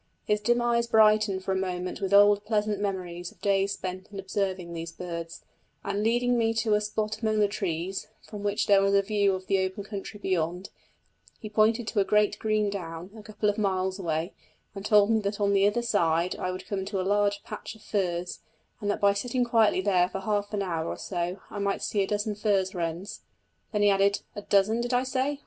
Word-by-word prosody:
His 210 0 +1
dim 240 +3 +2
eyes 235 0 +1
brightened 215 -3 +4
for 190 - -2
a - - +1
moment 185 -1 -3
with 195 -1 -2
old 205 0 +6
pleasant 210 -2 0
memories 180 -3 -4
of - - -24
days 200 0 +1
spent 185 +1 -6
in 200 - -7
observing 190 -3 -3
these 165 0 -5
birds; 170 -1 -7 0.4
and 200 +1 -2
leading 240 +2 +2
me 225 0 +1
to 220 -1 +1
a 210 - +3
spot 215 0 -2
among 215 -1 +1
the 210 -1 +4
trees, 190 -2 -3 0.2
from 210 -2 -8
which 205 0 0
there 200 -1 +5
was 195 0 +3
a 200 - +4
view 200 -1 +2
of 185 0 -7
the 195 0 +1
open 190 +2 -4
country 205 0 -7
beyond, 180 -1 -2 0.7
he 215 - -8
pointed 220 +2 +2
to 215 - 0
a - - +5
great 210 0 +2
green 215 -2 +1
down, 175 -1 -6
a 220 - -10
couple 210 0 -3
of 205 +1 +1
miles 190 -1 0
away, 165 0 -2 0.4
and 200 0 -5
told 210 0 +5
me 220 - +3
that 205 0 -3
on 200 -1 +2
the 200 0 +4
other 235 +4 0
side 170 -6 +1
I 185 - -3
would 185 0 -5
come 200 - -3
on 190 - -5
a 185 - 0
large 205 +1 +1
patch - - -7
of 220 - -18
furze, 180 -3 -2 0.4
and 205 - -3
that 205 - -1
by 200 0 +5
sitting 245 +5 -1
quietly 225 -5 +3
there 185 -2 +2
for 190 - -5
half 205 0 -1
an 205 -2 -1
hour 165 -3 -2
or - - -4
so 180 +1 -3
I 205 - -5
might 200 0 -1
see 205 - 0
a 195 - 0
dozen 210 +1 -1
furze 200 -3 0
wrens. 175 +3 -4 0.5
Then 210 -1 +1
he 205 - +6
added: 200 +1 +2
"A 205 - -5
dozen, 205 +3 +2
did 245 +1 -1
I 250 - +2
say? 265 +2 -1
200 Hz, 220 wpm, -27 LUFS, 190-215 Hz, 0.7 s, old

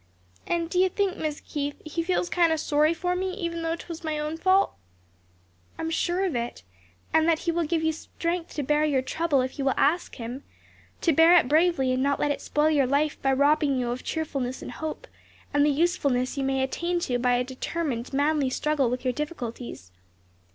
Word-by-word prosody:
And 340 -1 0
do 360 +2 -1
you 375 0 +4
think, 390 0 -1
Mis' 305 -1 -3
Keith, 290 -1 -3
He 310 +2 -2
feels 355 +1 0
kind 345 -2 +3
o' - - +3
sorry 305 0 +2
for 355 +2 -1
me 370 0 -2
even 340 -4 -3
though 330 0 -1
'twas 335 0 -9
my 310 -1 -2
own 300 +1 -3
fault?" 375 +3 +3 1.0
"I - - -4
am 325 - -2
sure 350 +3 0
of 355 - -2
it; 235 - -4 0.5
and 320 +1 +4
that 330 - +4
He 340 - +2
will 335 0 0
give 320 +1 0
you 320 - +2
strength 335 +2 -4
to 295 - -1
bear 295 +3 +2
your 280 -4 +1
trouble 290 +1 +1
if 260 +3 -4
you 275 - -1
will 270 - +2
ask 320 +6 +1
Him; 245 +3 -6 0.6
to 330 - +3
bear 330 +4 +7
it 335 - +3
bravely 305 -3 +3
and 255 - 0
not 280 +1 +1
let 290 - +1
it - - -3
spoil 300 +1 +1
your 280 -4 +3
life 290 +3 0
by 270 - +2
robbing 285 0 +3
you 245 -1 -1
of 250 +1 -5
cheerfulness 275 -5 -3
and - - -6
hope, 315 +10 -5 0.5
and 290 0 +4
the 300 - +4
usefulness 280 -5 +1
you 275 - -2
may 270 0 +1
attain 345 +6 -1
to 245 -7 -1
by 250 0 +2
a 245 - +1
determined, 260 -1 -3
manly 285 0 +1
struggle 285 -1 +1
with 250 +1 -3
your 255 - +1
difficulties. 245 - -6
300 Hz, 215 wpm, -26 LUFS, 270-335 Hz, 1.0 s, bear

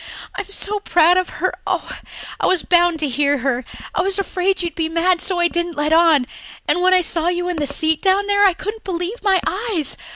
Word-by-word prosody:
I'm 400 - -6
so 410 +1 -2
proud 350 -2 +3
of 370 - 0
her. - - -2
Oh, - - -3 0.4
I - - +1
was 370 -3 +2
bound 350 -1 +3
to 300 - +1
hear 285 +2 +1
her. 260 -1 -1 0.3
I - - +1
was 385 +1 0
afraid 380 -1 -1
you'd 340 - -3
be 325 -2 -2
mad, 340 +2 +1
so 370 -2 -1
I 345 - +4
didn't 345 -2 -3
let 300 +2 +1
on 325 -5 +4 0.4
and 355 - +1
when 370 +1 +4
I 365 - +4
saw 335 -1 -2
you 355 0 -1
in 355 - -3
the 295 -1 0
seat 315 +2 0
down 390 +1 +2
there 405 0 +2
I 390 -2 +5
couldn't 425 +5 -6
believe 370 +5 -4
my 390 -2 +3
eyes. 380 - -1
350 Hz, 225 wpm, -19 LUFS, 320-380 Hz, 0.4 s, I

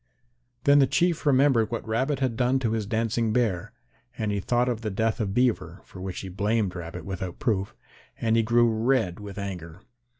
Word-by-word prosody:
Then 145 0 +6
the 135 - +5
Chief 170 +1 +1
remembered 130 -5 +4
what 115 0 -4
Rabbit 130 +6 0
had 130 -3 0
done 125 +2 +2
to 120 -4 -1
his 110 -3 -2
dancing 115 0 0
Bear, 105 -7 0 0.5
and 110 -2 -1
he 100 - -1
thought 120 +5 +1
of 120 -3 -1
the 110 - -2
death 110 +2 0
of 100 -3 -2
Beaver, 105 -8 0
for 95 - -11
which 95 -1 -5
he 95 - -7
blamed 100 +1 0
Rabbit 85 -2 -7
without 95 -2 -5
proof, 100 -6 -1 0.4
and 115 -1 +1
he 115 - +4
grew 120 +1 +4
red 110 -4 +1
with 105 -1 -8
anger. 90 -3 -6
110 Hz, 195 wpm, -26 LUFS, 95-120 Hz, 0.5 s, Then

